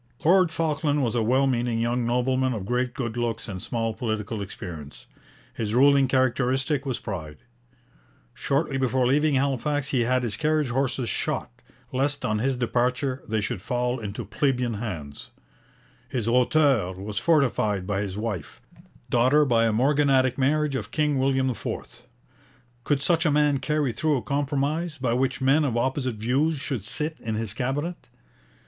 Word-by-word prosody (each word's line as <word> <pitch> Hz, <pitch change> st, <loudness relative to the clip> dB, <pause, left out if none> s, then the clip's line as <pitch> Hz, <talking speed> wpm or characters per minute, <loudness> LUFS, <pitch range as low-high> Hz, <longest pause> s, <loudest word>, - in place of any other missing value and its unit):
Lord 180 Hz, 0 st, +5 dB
Falkland 150 Hz, -3 st, 0 dB
was 115 Hz, -3 st, 0 dB
a 120 Hz, -, +1 dB
well 130 Hz, +5 st, +3 dB
meaning 120 Hz, -3 st, 0 dB
young 120 Hz, +1 st, 0 dB
nobleman 130 Hz, +1 st, +1 dB
of 105 Hz, -5 st, -4 dB
great 125 Hz, +4 st, -1 dB
good 120 Hz, -6 st, -3 dB
looks 120 Hz, -1 st, -2 dB
and 95 Hz, -4 st, -5 dB
small 115 Hz, 0 st, -2 dB
political 110 Hz, -2 st, -3 dB
experience. 85 Hz, -7 st, -8 dB, 0.5 s
His 110 Hz, -1 st, -3 dB
ruling 140 Hz, +1 st, +5 dB
characteristic 130 Hz, +2 st, +1 dB
was 130 Hz, -, -1 dB
pride. 80 Hz, -7 st, -6 dB, 1.0 s
Shortly 140 Hz, 0 st, -1 dB
before 130 Hz, -1 st, +1 dB
leaving 145 Hz, +3 st, +3 dB
Halifax 140 Hz, +2 st, 0 dB
he 130 Hz, -5 st, +1 dB
had 125 Hz, +2 st, +1 dB
his 110 Hz, -4 st, -2 dB
carriage 155 Hz, -3 st, +1 dB
horses 130 Hz, 0 st, -1 dB
shot, 145 Hz, -2 st, -2 dB, 0.4 s
lest 140 Hz, +2 st, -1 dB
on 105 Hz, 0 st, 0 dB
his 130 Hz, +2 st, 0 dB
departure 125 Hz, +2 st, 0 dB
they 110 Hz, -1 st, 0 dB
should 105 Hz, -2 st, -3 dB
fall 125 Hz, +3 st, -1 dB
into 110 Hz, +1 st, -5 dB
plebeian 125 Hz, +1 st, 0 dB
hands. 85 Hz, -10 st, -6 dB, 0.8 s
His 120 Hz, -4 st, -2 dB
hauteur 125 Hz, -, +3 dB
was 100 Hz, +3 st, -4 dB
fortified 120 Hz, -, +2 dB
by 100 Hz, 0 st, -1 dB
his 100 Hz, -1 st, -4 dB
wife, 105 Hz, -8 st, -4 dB, 0.5 s
daughter 130 Hz, +5 st, +4 dB
by 115 Hz, -3 st, +3 dB
a -, -, +2 dB
morganatic 135 Hz, +1 st, +3 dB
marriage 150 Hz, +2 st, +1 dB
of 110 Hz, -5 st, -3 dB
King 150 Hz, +1 st, +1 dB
William 130 Hz, 0 st, +2 dB
IV. 120 Hz, -, -6 dB, 0.8 s
Could 140 Hz, -2 st, +1 dB
such 170 Hz, 0 st, +2 dB
a 160 Hz, -, +3 dB
man 145 Hz, -1 st, +3 dB
carry 150 Hz, -3 st, 0 dB
through 150 Hz, +5 st, +1 dB
a 120 Hz, -, -4 dB
compromise, 145 Hz, -, -1 dB
by 125 Hz, -3 st, 0 dB
which 130 Hz, +2 st, 0 dB
men 135 Hz, +4 st, +4 dB
of 125 Hz, -5 st, 0 dB
opposite 130 Hz, 0 st, -1 dB
views 135 Hz, +9 st, +1 dB
should 130 Hz, -7 st, -3 dB
sit 155 Hz, +9 st, -3 dB
in 110 Hz, -1 st, -3 dB
his 110 Hz, -2 st, -2 dB
Cabinet? 140 Hz, +7 st, -3 dB
130 Hz, 160 wpm, -25 LUFS, 115-140 Hz, 1.0 s, Lord